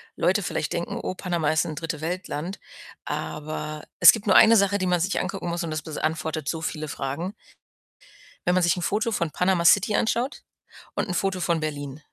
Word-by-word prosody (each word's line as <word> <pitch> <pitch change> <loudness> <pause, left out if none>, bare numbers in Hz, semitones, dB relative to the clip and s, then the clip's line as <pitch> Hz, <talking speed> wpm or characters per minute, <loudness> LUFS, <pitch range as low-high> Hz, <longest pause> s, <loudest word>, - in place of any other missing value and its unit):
Leute - - +1
vielleicht - - -2
denken, - - -3
„Oh, - - -3
Panama 170 -5 -1
ist 155 0 +2
'n 155 - -5
Dritte-Welt-Land“, 165 +2 -4 0.5
aber 150 0 -5 0.2
es - - +11
gibt 220 -2 -6
nur 190 - +5
1 225 0 +8
Sache, 200 0 +3
die 185 -2 -1
man 180 -1 +2
sich 195 +4 0
angucken 195 -3 -4
muss, 170 +1 -2
und 165 - -4
das 155 0 -2
beantwortet 155 -1 -3
so 160 -1 -3
viele 155 -1 -4
Fragen. 150 +10 -4 1.1
Wenn 180 - +3
man 185 - +3
sich 175 +1 +3
'n 180 - -4
Foto 215 +5 0
von 170 -7 -1
Panama 180 0 +1
City 205 +4 +5
anschaut 240 +5 -1 0.5
und - - -2
'n 180 - -2
Foto 190 0 -1
von 170 -1 +1
Berlin. 145 -2 -5
170 Hz, 195 wpm, -25 LUFS, 155-190 Hz, 1.1 s, es